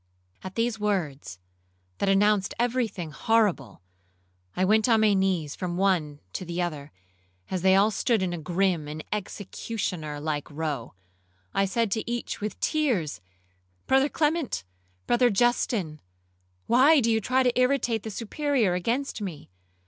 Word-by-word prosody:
At 185 0 -7
these 230 -1 0
words, 165 - -2 0.6
that 200 - +1
announced 200 0 +3
every 245 0 +1
thing 175 -6 -7
horrible, 205 - 0 0.7
I 185 - +2
went 215 +4 +3
on 225 -1 +4
my 215 -1 +4
knees 185 -6 0
from 175 -1 -4
one 170 -7 +1
to - - -4
the 170 0 -5
other, 155 -5 -3 0.6
as 185 -2 -1
they 190 +1 +5
all 200 +3 +4
stood 220 0 +1
in 180 -1 -1
a 175 - -4
grim 175 -1 0
and 155 +1 -6
executioner 190 -6 -4
like 150 -1 -3
row. 145 -7 -4 0.6
I 195 - +2
said 225 +2 0
to 225 +2 -2
each 240 -3 -4
with 210 0 -4
tears, 215 - 0 0.6
'Brother 270 +2 +3
Clement,—Brother 235 - -1
Justin,—why 155 - +1
do 230 -2 +2
you 220 0 +2
try 255 +5 +2
to 250 0 +1
irritate 250 -3 +2
the 220 - -6
Superior 235 -1 0
against 230 +8 -2
me? 165 - -7
195 Hz, 140 wpm, -26 LUFS, 155-230 Hz, 0.7 s, they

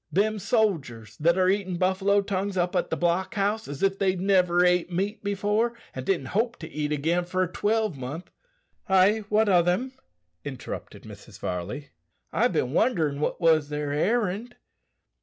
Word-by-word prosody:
Them 215 +3 +1
sodgers 145 - -1
that 170 +3 +2
are 185 -1 +3
eatin' 190 -2 0
buffalo 190 +2 +2
tongues 195 0 -2
up 175 +1 0
at 180 - 0
the - - -1
block 175 +5 0
house 210 +2 0
as 145 +3 -6
if 195 0 +1
they'd 190 -2 +1
niver 180 -2 +3
ate 180 0 +2
meat 200 +5 -2
before, 210 +4 0 0.2
and 130 - -5
didn't 150 -6 -1
hope 230 +4 +1
to - - -8
eat 150 0 -2
again 165 +4 +1
for 185 +1 -1
a - - -1
twelvemonth 180 - -2 0.2
" - - -39
"Ay, 195 +3 +4
what 215 +1 +3
o' 180 -3 +5
them?" 180 +10 0 0.5
interrupted 140 -3 -7
Mrs. - - -12
Varley; 95 +12 -5 0.4
"I've - - +2
bin 125 +2 0
wonderin' 155 - +1
what 150 - -1
was 160 -4 +3
their 150 -1 -3
errand." 210 +7 0
185 Hz, 170 wpm, -26 LUFS, 160-205 Hz, 0.5 s, o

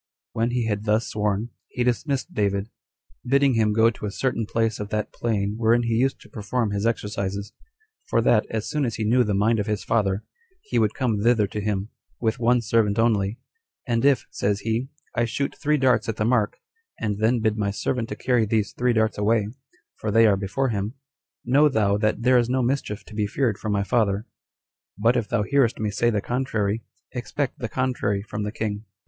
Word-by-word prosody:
When 115 +1 +1
he 120 -1 0
had 105 -1 -2
thus 110 +1 +1
sworn, 105 +1 -1 0.2
he 125 - -2
dismissed 130 +3 -1
David, 100 +1 -1 0.5
bidding 140 +1 +3
him 110 -2 +2
go 110 +2 +4
to 105 - -6
a - - -4
certain 115 -2 -1
place 115 -1 0
of 105 -1 -5
that 105 0 -2
plain 105 -3 -1
wherein 115 +1 +3
he 115 -1 0
used 130 +4 +1
to - - -16
perform 110 +1 -2
his 100 +2 0
exercises; 100 -3 -3 0.5
for - - +2
that, 110 -2 +3
as 110 -2 -3
soon 150 -1 -1
as 115 -4 -1
he 110 - -2
knew 120 +4 +4
the 105 -3 0
mind 110 +3 +2
of 105 - -2
his 105 -2 -1
father, 100 -3 +1 0.4
he 125 - 0
would 110 -1 +1
come 115 -6 0
thither 115 -1 +4
to 105 +1 -5
him, 100 0 -2 0.3
with 115 0 0
one 120 +1 +3
servant 105 -1 +2
only; 110 -2 +2 0.5
"and 115 -3 0
if," 140 -2 +3
says 100 0 -1
he, 115 +4 -1 0.2
"I 120 0 +1
shoot 140 +4 -2
three 150 0 +1
darts 130 -3 +2
at 110 - -1
the 105 - -1
mark, 115 -3 +1 0.4
and 105 -2 -2
then 115 +3 +2
bid 110 -1 +1
my 105 -2 0
servant 115 +4 -2
to - - -4
carry 120 -4 +1
these 110 -1 0
three 125 0 +1
darts 110 -1 +1
away, 105 0 +2 0.5
for 110 - -3
they 115 +2 +5
are 105 -2 +5
before 100 +8 -1
him, 105 +2 -2 0.5
know 145 +5 +5
thou 105 -5 +2
that 110 +2 0
there 125 0 +5
is 120 0 0
no 130 0 +1
mischief 120 -4 -2
to - - -13
be 105 -1 0
feared 110 -1 0
from 110 - -3
my 100 -1 +1
father; 100 0 +1 0.7
but 115 +4 +3
if 120 -4 -1
thou 105 - +1
hearest 135 0 +2
me 105 -1 -1
say 120 +4 +2
the 105 -3 0
contrary, 115 -3 -1 0.3
expect 135 +2 -3
the 120 - -3
contrary 105 -6 -1
from 105 0 -5
the 105 0 -2
king. 105 -1 -4
110 Hz, 210 wpm, -24 LUFS, 105-120 Hz, 0.7 s, they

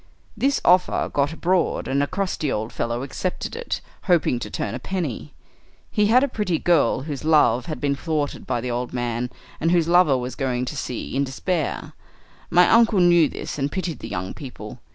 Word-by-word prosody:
"This 275 +1 +1
offer 180 0 +3
got 145 +1 +1
abroad, 175 +2 0
and 140 +1 +1
a 145 - +1
crusty 185 -7 -2
old 110 +2 -3
fellow 120 +2 -2
accepted 180 - -4
it, 485 +1 -4 0.2
hoping 165 -9 +2
to - - -6
turn - - -3
a - - -4
penny. 150 - -4 0.6
He 210 -1 +2
had 250 +5 +5
a - - +3
pretty 210 -9 -1
girl, 155 -8 +2
whose 145 -1 -5
love 150 -6 +3
had 155 - -4
been 140 -1 +1
thwarted 150 0 -3
by 120 -2 -1
the 125 0 -3
old 120 +1 -3
man, 120 0 -2 0.3
and 165 - +1
whose 170 -2 +3
lover 170 -6 +5
was 125 0 -4
going 125 -3 -1
to 150 - -5
sea 125 -3 -4
in 140 - +2
despair. 150 +4 -2 0.6
My 180 0 +5
uncle 230 -3 +5
knew 175 -3 +5
this - - -6
and 140 +1 -1
pitied 185 -4 -3
the 115 - -7
young 90 -1 -4
people. 125 -5 -9
150 Hz, 195 wpm, -23 LUFS, 125-180 Hz, 0.6 s, had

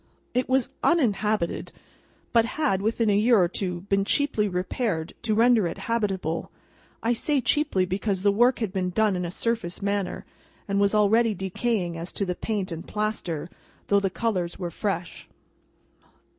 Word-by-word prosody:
It 250 +1 0
was 260 -1 +2
uninhabited, 215 - +1 0.6
but 230 -1 +6
had, 270 -12 +1
within 220 +1 +1
a - - +3
year 225 +3 +5
or 180 - +4
two, 180 -1 -3
been 195 +1 +1
cheaply 220 -1 +1
repaired 180 -2 -2
to 215 -2 0
render 230 -3 +4
it 165 - -5
habitable; 195 -8 -2 0.5
I 230 +2 +2
say 285 +4 +1
cheaply, 260 -7 +2
because 190 +1 -2
the 200 - +5
work 240 +5 +4
had 215 -5 -3
been 185 -2 0
done 210 +2 +2
in 180 0 -2
a - - -3
surface 210 -2 -2
manner, 200 -1 -2 0.4
and 200 0 0
was 200 +1 +3
already 215 +1 +4
decaying 190 -2 -2
as 170 +2 -6
to 200 - -1
the 180 - -1
paint 200 -1 -3
and 165 0 -6
plaster, 210 -7 -2 0.4
though 200 - +5
the 195 -1 0
colours 185 -5 -2
were 175 -2 -4
fresh. 175 -2 -4
200 Hz, 165 wpm, -26 LUFS, 180-230 Hz, 0.6 s, but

